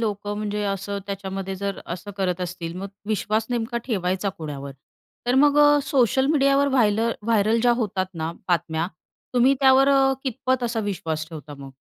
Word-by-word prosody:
लोकं 205 -2 -2
म्हणजे 210 0 -2
असं 200 0 -2
त्याच्यामध्ये 195 -1 -4
जर 200 0 -4
असं 180 +4 -6
करत 185 -2 -1
असतील, 170 -1 -5
मग 195 +2 -5 0.2
विश्वास 215 +1 0
नेमका 235 0 -1
ठेवायचा 190 -3 -1
कोणावर? 140 -3 -6 0.5
तर 245 - +2
मग, 290 +2 +5
अ, 290 0 +6
सोशल 265 -1 +2
मीडियावर 280 -1 +3
व्हाय 245 -6 +3 0.3
व्हायरल 220 0 +2
ज्या 240 +1 +4
होतात 190 -3 -1
ना 160 0 -3 0.2
बातम्या, 165 -1 0 0.5
तुम्ही 255 +3 +5
त्यावर 270 0 +6
अ, 270 -1 +4
कितपत 255 0 -1
असा 230 -1 -1
विश्वास 160 -3 -4
ठेवता 155 -2 -9
मग? 140 - -9
205 Hz, 165 wpm, -24 LUFS, 185-255 Hz, 0.5 s, अ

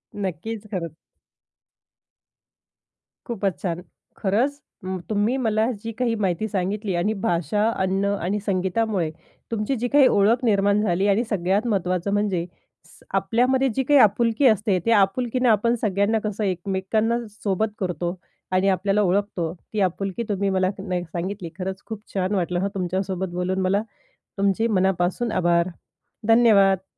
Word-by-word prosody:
नक्कीच, 205 +3 -4
खरंच. 170 -5 -3 2.4
खूपच 195 - -2
छान! 175 -1 -2 0.4
खरंच 250 +9 0 0.2
म 185 0 -3
तुम्ही 215 +4 +1
मला 220 -3 +1 0.2
जी 230 - -4
काही 245 -2 +1
माहिती 195 +1 0
सांगितली 200 +1 -2
आणि 185 +5 +1
भाषा, 205 0 0
अन्न, 190 -1 0 0.2
आणि 195 +4 -1
संगीतामुळे 190 -2 0 0.4
तुमची 225 +4 -1
जी 245 0 -1
काही 280 0 +5
ओळख 220 +4 +3
निर्माण 205 -1 +3
झाली 195 -1 +1
आणि 205 +4 +3
सगळ्यात 200 +3 0
महत्त्वाचं 185 -2 0
म्हणजे 200 -4 0 0.4
स 175 - -19
आपल्यामध्ये 245 +7 +2
जी 265 - +1
काही 285 +1 +5
आपुलकी 230 +5 +4
असते, 210 -3 +2
ते 230 - +2
आपुलकीनं 235 +4 +2
आपण 230 +2 +3
सगळ्यांना 200 +2 +1
कसं 215 0 -2
एकमेकांना 195 +4 0
सोबत 210 0 -1
करतो 180 -2 -2 0.4
आणि 185 +1 +2
आपल्याला 195 +2 +1
ओळखतो, 185 -3 0
ती 200 +4 -7
आपुलकी 195 +4 -1
तुम्ही 200 -1 0
मला 185 -1 +1
ना 190 -1 -3
ही 175 - -1
सांगितली 175 +2 -5
खरंच 190 +1 -4
खूप 220 -2 -6
छान 190 +1 0
वाटलं 175 -1 0
हां, 195 - 0
तुमच्यासोबत 185 0 -2
बोलून 180 +1 -1
मला. 195 +2 +2 0.6
तुमचे 200 +3 +2
मनापासून 190 +2 +1
आभार. 170 0 +2 0.6
धन्यवाद. 200 -5 +5
200 Hz, 140 wpm, -23 LUFS, 185-220 Hz, 2.4 s, काही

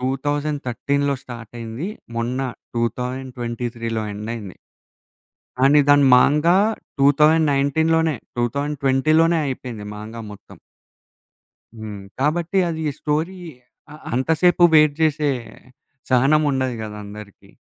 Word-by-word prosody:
2013లో 140 0 -1
స్టార్టయ్యింది. 115 - -7 0.3
మొన్న 120 +2 -2 0.4
2023లో 120 -1 -3
ఎండయ్యింది. 105 -2 -6 1.0
కానీ 140 +3 +5
దాన్ని 145 -1 +6
'మాంగా' 150 +7 +4 0.4
2019 150 +1 +3
లోనే 160 -1 +2 0.2
2020 140 +3 0
లోనే 165 0 +3
అయిపోయింది. 125 -5 -6
'మాంగా' 110 +2 -8
మొత్తం. 100 - -14 1.2
హ్మ్. 105 -3 -8 0.2
కాబట్టి 170 +6 0
అది 160 -1 -4
స్టోరీ 160 +5 -2 0.5
అ - - -11 0.2
అంతసేపు 160 +7 +3
వేయిట్ 155 -2 +5
జేసే, 150 -2 +2 0.8
సహనం 135 +5 +4
ఉండదు 130 -2 -1
కదా! 105 -1 -7
అందరికి. 105 0 -12
135 Hz, 90 wpm, -21 LUFS, 120-150 Hz, 1.2 s, దాన్ని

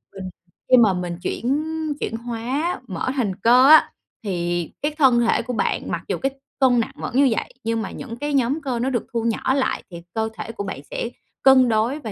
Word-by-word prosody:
mình 190 -1 -6 0.4
khi 255 - +7
mà 220 -5 +5
mình 175 -1 -4
chuyển 275 +5 -1 0.4
chuyển 225 - -3
hóa 245 +9 -3
mỡ 180 +1 -4
thành 210 -9 -1
cơ 245 +6 +5
á 315 - +7 0.3
thì 175 -3 -2
cái 295 - 0
thân 260 -5 +5
thể 230 -1 +2
của 250 +2 -5
bạn - - -1
mặc - - -3
dù - - -1
cái 270 0 -1 0.3
cân 255 -2 +4
nặng 230 - -2
vẫn 250 - -6
như 275 +1 +5
vậy, - - -4
nhưng 225 0 -1
mà 195 - -5
những 235 -3 -8
cái 290 +2 -3
nhóm 275 +4 +1
cơ 255 -4 -2
nó 250 +3 0
được 245 -3 -2
thu 230 -1 -1
nhỏ 230 +3 0
lại 270 -1 0
thì 170 -1 -8
cơ 220 0 0
thể - - -5
của 220 -3 -5
bạn 190 -8 -6
sẽ 235 - -3 0.3
cân 260 -2 +6
đối 225 +7 +1
và 220 -6 -6
235 Hz, 225 wpm, -22 LUFS, 220-265 Hz, 0.4 s, khi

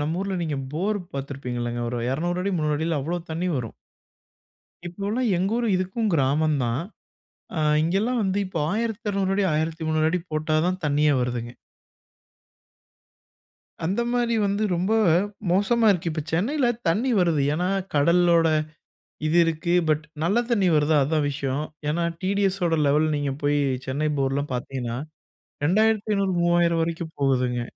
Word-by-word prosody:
நம்ம 160 +4 -2
ஊர்ல 195 -1 -2
நீங்க 155 -4 -2 0.2
போர் 200 +7 -1 0.2
பார்த்துருப்பீங்கல்லங்க 125 -4 -4
ஒரு 125 - -3
200 175 +6 -1
அடி 200 - -1
300 150 -1 0
அடியில 160 0 -1
அவ்ளோ 165 +6 -2
தண்ணி 165 +3 -2
வரும். 115 -4 -4 1.1
இப்பவுலாம் 205 +7 -2
எங்க 190 +4 0
ஊரு 240 - 0
இதுக்கும் 190 +4 -1
கிராமம் 150 +2 +2
தான். 120 +5 -1 0.8
அ - - 0 0.2
இங்கேலாம் 205 +9 0
வந்து 190 +1 0
இப்போ 185 - -4
1200 210 -3 -1
அடி 200 - +1
1300 160 0 0
அடி 180 - 0
போட்டா 155 0 0
தான் 185 0 -1
தண்ணீயே 150 0 +3
வருதுங்க. 120 -1 -2 2.3
அந்தமாரி 235 +5 0
வந்து 200 +2 -1
ரொம்ப 185 +5 0 0.6
மோசமா 215 +5 +3
இருக்கு. 170 -3 0
இப்ப 155 - -3
சென்னையில 245 - +1 0.2
தண்ணீர் 225 +5 +2
வருது. 165 -5 +2
ஏனா, 180 +3 0 0.3
கடலோட 170 +2 +4 0.8
இது 165 +3 +2
இருக்கு 165 +2 -1 0.2
பட் 155 0 +1 0.2
நல்ல 200 +7 +2
தண்ணீ 205 -6 +2
வருதா? 150 +1 +3
அதுதான் 150 +1 0
விஷயம். 140 0 -2 0.3
ஏனா, 170 +3 0 0.2
டிடிஎஸ் 195 0 0
ஓட 165 - +1
லெவல் 150 +2 +3
நீங்க 145 -1 -1
போய் 145 0 +2 0.3
சென்னை 150 +4 -1
போர்லாம் 135 +1 -1
பார்த்தீங்கன்னா, 125 -1 -4 0.7
ரூ.2500 205 +2 +2
ரூ.3,000 170 -1 +3
வரைக்கும் 165 0 -4
போகுதுங்க. 125 -3 +1
165 Hz, 135 wpm, -24 LUFS, 145-195 Hz, 2.3 s, கடலோட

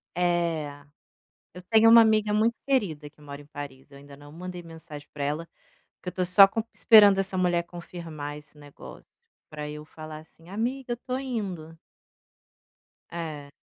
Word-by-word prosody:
É. 170 -5 -1 0.7
Eu 180 - -10
tenho 225 0 +6
uma 230 0 +9
amiga 215 -1 +3
muito 225 +2 +2
querida 165 - 0
que 150 - -25
mora 140 0 -9
em - - -16
Paris, 145 -2 -9
eu 140 - -14
ainda 140 0 -14
não 145 0 -14
mandei 180 +2 -7
mensagem 160 -3 -11
para 145 - -4
ela, 150 +4 -2 0.6
porque - - -8
eu - - -1
estou 180 0 -2
só 195 +2 +7
com 225 +2 -3
esperando 205 -3 +7
essa 190 0 -2
mulher 175 -2 +2
confirmar 165 -4 -8
esse 150 0 -19
negócio 145 -1 -13 0.5
para 150 -1 -6
eu 150 0 -8
falar 155 0 -10
assim: 165 +1 -20
"Amiga, 240 +6 -3
eu - - +1
estou 255 +2 -5
indo". 190 -11 -5 1.3
É. 155 -4 -6
170 Hz, 165 wpm, -26 LUFS, 150-200 Hz, 1.3 s, uma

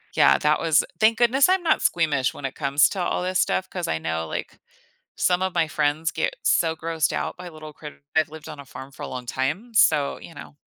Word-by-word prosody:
yeah, - - +5
that 150 0 +2
was 165 -2 +3 0.2
thank 220 +1 +4
goodness 245 +4 +4
I'm 375 0 +2
not 320 - +2
squeamish 150 -6 +1
when - - -11
it 135 - -4
comes 140 +1 +3
to 190 - -4
all 180 - -1
this 185 0 0
stuff 190 - 0
'cause 180 -2 -4
I 80 - 0
know, 80 0 -3
like, - - -6 0.6
some 180 0 +2
of 190 -1 -1
my 160 - +1
friends 155 +1 0
get 160 - -2
so 165 -1 +2
grossed 165 -1 -1
out - - -3
by 180 0 -8
little 155 -2 -11
critt 150 -1 -11
I've 155 -1 +3
lived 160 0 -11
on - - -8
a 140 - -10
farm 130 +2 -10
for - - -9
a - - -4
long 125 -1 -6
time, 150 - -3
so 150 -9 +3
you - - -12
know? 75 0 -11
160 Hz, 235 wpm, -24 LUFS, 140-180 Hz, 0.6 s, yeah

